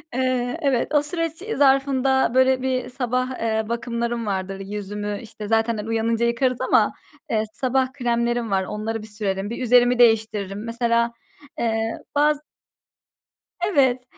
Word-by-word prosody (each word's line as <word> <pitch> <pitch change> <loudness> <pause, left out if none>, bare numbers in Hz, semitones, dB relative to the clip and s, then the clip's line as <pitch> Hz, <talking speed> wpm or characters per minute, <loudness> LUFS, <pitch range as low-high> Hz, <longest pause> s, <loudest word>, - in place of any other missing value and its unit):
Eee, 255 -1 0
evet 270 -4 +1
o 295 - +4
süreç 330 +2 -3
e 445 +2 -4
zarfında 270 -2 +3
böyle 260 0 +4
bir 255 -1 -1
sabah, 255 0 -1
eee, 220 -1 -1
bakımlarım 235 0 -2
vardır. 195 -1 -3
Yüzümü 205 +1 -4
işte, 215 -2 -8
zaten 225 0 +1
he 210 - -4
uyanınca 225 +1 +1
yıkarız 245 +1 0
ama, - - +3 0.4
eee, 220 -1 +1
sabah 260 0 0
kremlerim 235 -3 -1
var, 190 -1 +2
onları 215 +3 -4
bir 215 - -10
sürerim, 205 -1 -3
bir 235 - -5
üzerimi 245 0 +4
değiştiririm. 215 -3 +2
Mesela, 235 0 +1 0.5
eee, 225 -1 -1 0.2
baz 295 0 +3 1.3
Evet 260 -8 +2
235 Hz, 140 wpm, -23 LUFS, 220-260 Hz, 1.3 s, o